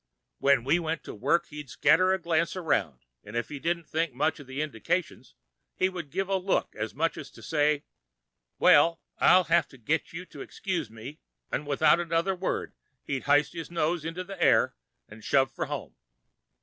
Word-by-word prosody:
When 140 -4 +4
we 145 +7 +2
went 160 -3 -3
to - - -8
work, 145 +10 +1
he'd 150 -2 -8
scatter 185 +9 +4
a 190 - +2
glance 170 -1 0
around, 95 - -1 0.2
'n' 105 - -10
if 120 - -2
he 145 - -6
didn't 170 +3 -1
think 160 -4 -1
much 160 +4 0
of 140 - -12
the 130 +2 -6
indications, 155 +5 -3 0.4
he 185 - +2
would 175 -5 -7
give 190 +5 -2
a 195 0 +1
look 190 +1 -1
as 110 +1 -4
much 165 +3 0
as 150 - -8
to - - -15
say, 150 -1 +1 0.7
'Well, 165 0 +5 0.2
I'll 185 0 +6
have 170 0 +2
to 135 - -16
get 150 +7 -1
you 180 +2 -7
to - - -11
excuse 170 - -3
me,' 115 +7 -10 0.3
'n' 150 - -2
without 145 +4 +4
another 170 +2 0
word 185 0 -3 0.3
he'd 135 -2 -3
hyste 145 +2 +3
his 165 -2 -6
nose 170 -1 0
into 165 +3 -4
the 190 -1 -9
air - - +4 0.3
'n' 110 +1 -13
shove 135 +4 +2
for - - -3
home. - - -5
160 Hz, 190 wpm, -28 LUFS, 140-175 Hz, 0.7 s, I'll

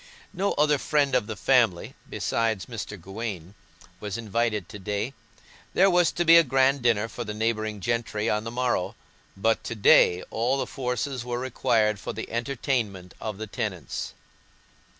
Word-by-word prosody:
No 195 +3 0
other 150 -1 +3
friend 145 -2 +1
of 125 -5 +2
the 110 - -4
family, 115 -10 +2 0.2
besides 110 -5 -1
Mr. 110 -4 -6
Gawaine, 95 -1 -6 0.5
was 105 -1 -4
invited 110 -3 -1
to 105 - -9
day; 105 +6 -3 0.6
there 195 +1 +5
was 175 -2 +4
to 175 - 0
be 165 +1 +9
a 170 - +7
grand 135 0 +2
dinner 115 -3 +2
for 120 +2 -6
the 105 -2 -5
neighbouring 110 -1 -1
gentry 115 -1 -1
on 105 -1 +1
the 115 - -4
morrow, 120 -6 -1 0.4
but 110 +3 +1
to 115 - -4
day 90 -3 +5
all 120 +4 +1
the - - -1
forces 130 0 -3
were 120 0 -3
required 110 -4 +1
for - - -5
the 110 - -6
entertainment 115 -6 -2
of 110 -3 -4
the 110 - -5
tenants. 100 - -4
115 Hz, 165 wpm, -26 LUFS, 105-130 Hz, 0.6 s, be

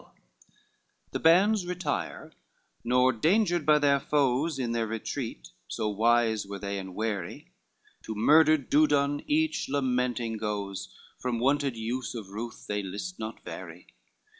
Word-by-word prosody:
LIV - - -25 1.1
The 160 - +6
hands 195 +3 +4
retire, 180 -4 -3 0.5
not 125 -1 +2
dangered 175 -3 +2
by 150 0 +6
their 140 -1 +3
foes 140 +2 +1
In 125 -3 -2
their 115 -1 0
retreat, 110 - -5 0.2
so 110 -2 -2
wise 110 0 +2
were 100 0 -5
they 100 0 -4
and 95 -1 -8
wary, 105 -5 -4 0.5
To 110 - -5
murdered 155 +5 +4
Dudon 145 -1 +3
each 310 - +1
lamenting 125 -4 0
goes, 100 -2 -4 0.3
From 125 -2 -2
wonted 135 0 +1
use 115 +1 -3
of 105 -5 -7
ruth 110 +3 -7
they 105 0 -2
list 100 - -6
not 110 +1 -7
vary. - - -9
125 Hz, 140 wpm, -28 LUFS, 110-145 Hz, 1.1 s, The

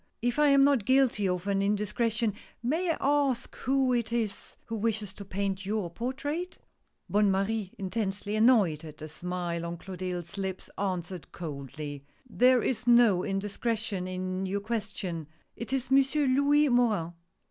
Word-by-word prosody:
If 245 +4 +1
I 300 - +6
am 275 -1 +6
not 275 -5 +4
guilty 260 -5 +3
of 180 0 -2
an 200 -1 +1
indiscretion, 210 +2 0 0.3
may 325 +9 0
I 325 - +1
ask 275 -4 +1
who 265 -1 +1
it 235 -2 0
is 225 -4 -2
who 230 - -4
wishes 215 -2 -1
to 200 - -8
paint 195 0 -2
your 200 -3 -2
portrait? 280 - -3 0.3
" - - -48
Bonne 205 0 +3
Marie 195 +1 0
intensely 200 +1 -2
annoyed 215 - +4
at 155 -2 -10
the 155 - -7
smile 175 +1 -4
on 170 0 -4
Clo 190 +2 -8
tilde's 180 0 -5
lips 190 -1 -4
answered 185 -4 -3
coldly: 145 -2 -6 0.2
" - - -35
There 250 0 +4
is 245 -1 -1
no 235 -6 +6
indiscretion 205 0 -2
in 185 +1 -3
your 200 +2 -2
question 200 -7 -4
— - - -38
it 235 - -6
is 265 -1 -1
Monsieur 275 +2 +4
Louis 285 +3 +4
Morin." 215 -9 +2
210 Hz, 165 wpm, -29 LUFS, 185-245 Hz, 0.3 s, I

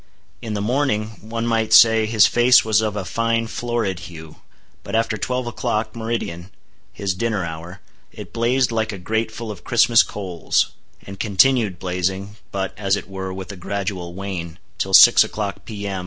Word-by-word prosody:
In 110 -2 -4
the 100 - -2
morning, 115 -3 0 0.2
one 115 0 -3
might 115 -2 0
say, 110 -1 +6
his 110 -2 +5
face 120 0 +5
was 110 -1 +3
of 110 -1 -2
a 100 -3 -4
fine 115 +2 0
florid 115 -5 -3
hue, 80 -2 -12 0.4
but - - -5
after 115 -1 +1
twelve 125 +4 -2
o'clock, 115 -2 -3
meridian—his 100 -3 -6
dinner 105 -1 -2
hour—it 85 +3 -11
blazed 120 +2 +1
like 110 -1 -1
a 100 - -6
grate 110 +5 -2
full 110 0 -7
of 100 - -10
Christmas 115 0 +4
coals; 95 -5 -1 0.3
and 100 -1 -10
continued 110 -1 +2
blazing—but, 95 +2 -4
as 100 -1 +1
it 100 - -6
were, 95 -1 -6
with 95 +1 -7
a - - -9
gradual 95 -2 -4
wane—till 95 0 -3
6 120 -2 +9
o'clock, 105 -2 -5
P.M. 100 -3 -5
105 Hz, 155 wpm, -21 LUFS, 95-115 Hz, 0.4 s, 6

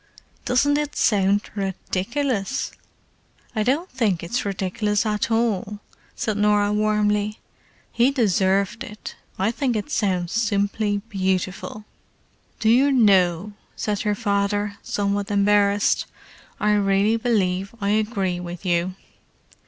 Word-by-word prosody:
"Doesn't 285 +4 +3
it 295 0 -3
sound 200 -1 +2
ridiculous!" 200 +5 -2 0.8
"I 215 - +1
don't 275 +11 +1
think 205 - -1
it's 235 +9 -2
ridiculous 200 +2 -1
at 210 0 0
all," 220 -3 0 0.4
said 215 -2 -2
Norah 210 0 +3
warmly. 210 0 +1 0.5
"He 240 +2 +3
deserved 200 -3 +1
it. 210 0 -9 0.2
I 195 +4 +1
think 245 0 -1
it 210 -2 -3
sounds 180 -4 0
simply 205 -2 0
beautiful!" 190 +1 -2 0.7
"Do 220 - 0
you 265 +5 +5
know," 195 -5 +3 0.2
said 210 -2 -2
her 210 -1 0
father, 205 -1 -1
somewhat 200 0 -1
embarrassed—"I 205 +1 0
really 200 +1 +3
believe 200 -4 0
I 200 -1 -1
agree 210 -4 0
with 175 +1 -7
you!" 175 +1 0
205 Hz, 115 wpm, -23 LUFS, 195-220 Hz, 0.8 s, you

